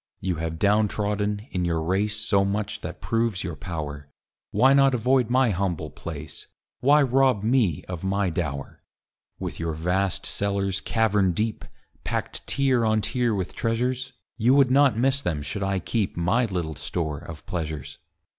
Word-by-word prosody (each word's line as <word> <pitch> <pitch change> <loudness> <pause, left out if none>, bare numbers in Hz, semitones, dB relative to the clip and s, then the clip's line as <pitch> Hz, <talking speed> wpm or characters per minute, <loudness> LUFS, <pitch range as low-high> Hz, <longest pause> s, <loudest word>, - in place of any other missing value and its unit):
You 90 -3 -2
have 80 0 -3
down 105 +3 +3
trodden, 105 0 -2
in 90 -1 -1
your 85 -2 0
race, 95 +6 0
So 105 -2 +2
much 100 +1 -2
that - - -7
proves 115 -4 0
your 85 - -4
power, 75 -2 -6 0.4
Why 135 +2 +5
not 135 -1 +5
avoid 125 0 +2
my 125 -1 +3
humble 85 -5 -2
place? 80 -2 -8 0.3
Why 145 +3 +5
rob 130 -4 +3
me 110 - +2
of 90 -2 -6
my 95 -1 0
dower? 70 -5 -4 0.6
With - - -5
your 85 -1 -2
vast 90 +4 0
cellars, 100 -1 -1
cavern 105 -5 +2
deep, 110 +4 -2 0.4
Packed - - -4
tier 130 -4 +2
on 110 -1 +2
tier 120 0 0
with 95 -2 -3
treasures, 125 +3 -1 0.2
You 120 +3 +4
would 135 -3 +5
not 135 -4 +5
miss 135 +3 +2
them 80 - -2
should 100 +7 -4
I 95 0 0
keep 100 +2 -2
My 95 +9 +2
little 90 -7 -3
store 75 -1 -3
of 80 +1 -10
pleasures. 80 -5 -5
100 Hz, 165 wpm, -25 LUFS, 85-115 Hz, 0.6 s, Why